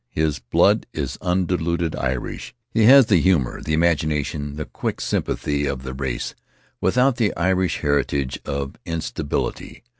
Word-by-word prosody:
His 75 -2 -1
blood - - +2
is - - -4
undiluted 85 -2 0
Irish; 65 -2 -4 0.2
he 110 -2 +4
has 135 +2 +9
the 95 -7 +3
humor, 85 -9 +1
the 80 - -3
imagination, 75 -3 0
the 75 0 -4
quick - - -4
sympathy 75 0 -1
of 70 -2 -3
the 65 0 -5
race, 65 -2 -3 0.5
without 125 0 +3
the 110 -6 +2
Irish 90 +1 +1
heritage 70 -2 0
of 70 0 -4
instability. 80 +2 -4
75 Hz, 140 wpm, -22 LUFS, 70-90 Hz, 0.5 s, has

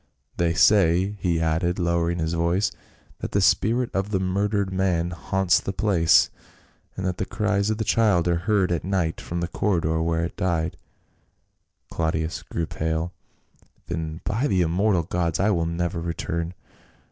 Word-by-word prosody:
"They 85 -1 +1
say," 95 0 +4
he 85 -3 0
added, 80 +2 0
lowering 85 -1 0
his 80 0 -1
voice, 85 +4 +1 0.5
"that - - -5
the 100 - +3
spirit 115 +5 +2
of 95 +1 -1
the 100 -3 0
murdered 100 +1 0
man 90 -2 0
haunts 95 +1 +1
the 95 - -4
place, 90 -5 +3 0.7
and 95 - -3
that 90 -1 -1
the 95 - -2
cries 105 -1 0
of 110 - 0
the 110 - -1
child 100 -6 +2
are 85 -1 +2
heard 100 -4 +3
at 85 - -1
night 90 -3 -1
from 85 0 -4
the 85 - -1
corridor 85 -5 0
where 85 0 0
it 85 - -7
died." 85 -3 -1 1.2
Claudius 80 0 -1
grew 85 - -3
pale. 80 +2 -2 0.7
"Then 80 -1 -4
by 115 +7 0
the 95 -7 +2
immortal 90 +2 +1
gods 85 -1 -1
I 100 +3 +3
will 85 -4 0
never 85 0 -2
return 85 +1 -3
85 Hz, 160 wpm, -24 LUFS, 85-95 Hz, 1.2 s, say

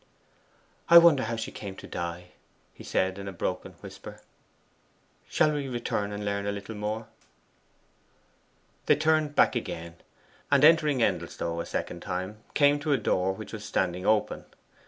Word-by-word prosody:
'I 170 - +10
wonder 170 -5 +7
how 115 +1 -2
she 115 0 -5
came 100 -2 -7
to - - -11
die,' 85 +1 -6 0.4
he - - -13
said 95 +1 -1
in 100 - -7
a - - -4
broken 90 - -4
whisper. - - -10 1.1
'Shall 155 - +2
we 145 -2 -3
return 120 -5 -2
and 105 0 -5
learn 100 0 -2
a - - +1
little 100 +2 -6
more?' 105 +1 -4 1.8
They - - +6
turned 155 -2 +1
back - - +4
again, 85 +1 -5 0.5
and 140 0 +4
entering 150 -5 +5
Endelstow 85 -3 -2
a - - -7
second 85 - -4
time, 95 +4 -4 0.2
came 145 0 +4
to 145 0 0
a - - +3
door 95 -4 0
which 110 +4 -9
was 105 -1 -6
standing 90 -3 -1
open. 110 -1 +1
105 Hz, 155 wpm, -27 LUFS, 95-140 Hz, 1.8 s, I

